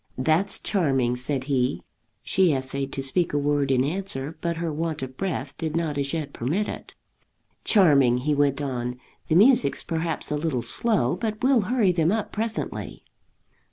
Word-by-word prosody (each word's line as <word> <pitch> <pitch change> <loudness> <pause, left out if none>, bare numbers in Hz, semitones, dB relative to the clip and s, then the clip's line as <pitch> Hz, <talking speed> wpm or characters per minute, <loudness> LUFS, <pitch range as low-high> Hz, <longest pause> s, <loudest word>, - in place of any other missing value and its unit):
"That's 160 +9 +1
charming," 135 - 0
said 130 +2 +1
he. 130 -1 -1 0.4
She 185 -4 +3
essayed 135 +1 -3
to 135 - -3
speak 165 +5 0
a - - +1
word 145 -1 +1
in 130 -1 +3
answer, 155 -2 -1
but 170 -1 -1
her 165 -2 -3
want 155 -2 -3
of 130 0 -7
breath 145 -6 -4
did 160 -1 -3
not 165 -3 -1
as 140 -1 -1
yet 155 -4 -4
permit 165 - -1
it. - - -8 0.7
"Charming!" 140 - +5
he 145 +4 0
went 145 -1 +1
on. 125 -2 -3 0.3
"The 160 - +1
music's 240 +7 +4
perhaps 165 -2 -3
a - - +1
little 145 -5 -2
slow, 200 - +2
but 215 +3 -4
we'll 260 -3 +4
hurry 235 -7 +3
them 165 -1 +1
up 220 0 -2
presently." 225 +1 -4
150 Hz, 170 wpm, -25 LUFS, 135-180 Hz, 0.7 s, Charming